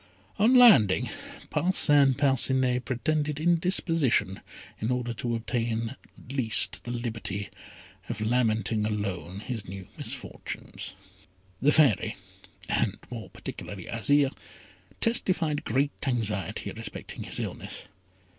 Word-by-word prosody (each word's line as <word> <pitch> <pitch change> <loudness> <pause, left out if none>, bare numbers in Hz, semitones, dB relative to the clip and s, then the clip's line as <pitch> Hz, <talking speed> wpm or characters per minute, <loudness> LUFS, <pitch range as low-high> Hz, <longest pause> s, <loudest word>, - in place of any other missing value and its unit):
On 230 +5 +5
landing, 200 - +7 0.4
Parcin 145 -7 +4
Parcinet 130 -2 +2
pretended 150 +3 -1
indisposition 165 - +2 0.4
in 110 - -1
order 125 -1 -1
to 120 +1 -2
obtain 115 0 -2 0.2
at 130 - -9
least 115 -5 +1
the - - -6
liberty 110 -4 -3 0.6
of - - -3
lamenting 110 -2 +1
alone 100 -3 -3
his 115 -2 -5
new 95 0 -7
misfortunes. - - -6 0.7
The 145 - +5
Fairy, 145 -11 +4 0.5
and - - +1
more - - -6
particularly 95 -3 -8
Azire, 135 +5 +3 0.7
testified 180 -10 +1
great 140 +2 +1 0.2
anxiety 110 -6 -1
respecting - - -7
his - - -3
illness. - - -5
125 Hz, 105 wpm, -28 LUFS, 110-145 Hz, 0.7 s, landing